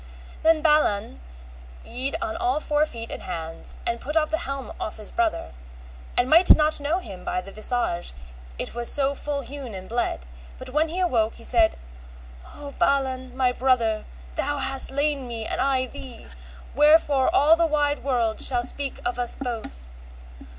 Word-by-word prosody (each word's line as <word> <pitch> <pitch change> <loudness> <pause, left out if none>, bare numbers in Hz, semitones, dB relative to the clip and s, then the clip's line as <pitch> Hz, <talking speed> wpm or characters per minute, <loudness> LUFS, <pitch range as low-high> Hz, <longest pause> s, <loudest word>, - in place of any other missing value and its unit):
Then 320 -1 +3
Balan 300 - +2 0.7
yede 265 +5 -3
on 335 -1 -3
all 365 -1 0
four 300 0 +1
feet 230 -3 -8
and - - -6
hands, 165 0 -7
and 235 0 -2
put 300 +3 -2
off 310 -1 +1
the 320 - 0
helm 275 -2 -5
off 215 - -5
his 215 -2 -7
brother, 335 - -1 0.7
and 245 - +4
might 335 +6 +8
not 305 0 +2
know 295 +4 0
him 195 - -9
by - - -2
the 195 +2 -9
visage 215 -5 -2 0.5
it - - -4
was 240 0 +3
so 280 -1 +3
ful 285 0 -3
hewn 265 -4 -8
and 185 0 -8
bled; 235 - -2 0.3
but 255 0 -8
when 305 +4 +2
he 340 +4 -4
awoke 235 -12 +1
he 230 - -14
said, 225 -3 +4 0.8
O 285 -1 -8
Balan, 260 -2 0
my 255 -1 +3
brother, 240 -4 +1 0.3
thou 290 - -2
hast 270 -1 +4
slain 280 -1 -1
me 230 -2 -5
and - - -2
I 265 -1 +1
thee, 250 -1 -10 0.5
wherefore 295 -3 +4
all 305 +3 +5
the 335 0 +2
wide 295 -1 +1
world 235 -5 0
shall 245 -2 +3
speak 275 +2 -4
of 245 0 -2
us 245 -1 0
both. 230 - -6
265 Hz, 170 wpm, -24 LUFS, 235-295 Hz, 0.8 s, might